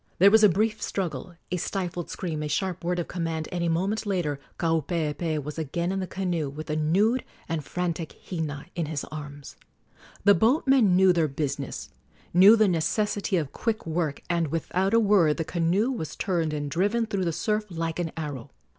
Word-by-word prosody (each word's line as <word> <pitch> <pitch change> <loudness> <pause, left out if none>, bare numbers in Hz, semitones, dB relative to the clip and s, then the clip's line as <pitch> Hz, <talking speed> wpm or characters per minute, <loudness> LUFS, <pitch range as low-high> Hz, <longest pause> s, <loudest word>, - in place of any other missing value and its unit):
There 200 +3 +7
was 220 0 +6
a 210 - +9
brief 215 +4 0
struggle, 175 -2 -3 0.2
a 180 - 0
stifled 180 -1 -3
scream, 160 -5 -4
a 150 - -2
sharp 180 +4 -2
word 175 +1 0
of 175 - -2
command, 165 -2 -3
and 175 -1 -2
a 170 - +1
moment 190 +6 0
later 170 -8 -1 0.2
Kaupeepee 160 -1 -1
was 150 +3 -6
again 170 +4 -2
in 195 - -1
the 185 - -3
canoe 175 -7 -2
with 155 +3 -7
the 155 - -2
nude 195 +11 +2 0.2
and 165 -2 -2
frantic 170 -2 -3
Hina 155 -5 -4
in 170 -3 -2
his 150 -2 -3
arms. 145 -2 -8 0.7
The 200 +1 +7
boatmen 240 - +4
knew 185 0 +6
their 165 -3 +2
business 140 -1 -4 0.4
knew 190 +5 +8
the 215 -2 +4
necessity 200 +3 0
of 150 -5 -2
quick 225 -1 -2
work 160 -3 -2
and 170 -2 +1
without 185 +6 0
a - - +6
word 200 -8 +4
the 165 - -2
canoe 180 +10 +1
was 160 - -4
turned 170 -5 0
and 145 -1 -3
driven 205 +8 +1
through 200 -4 -2
the 170 - +1
surf 210 +5 -1
like 165 -1 -3
an 165 -2 -2
arrow. 145 -5 -5
170 Hz, 190 wpm, -26 LUFS, 155-195 Hz, 0.7 s, a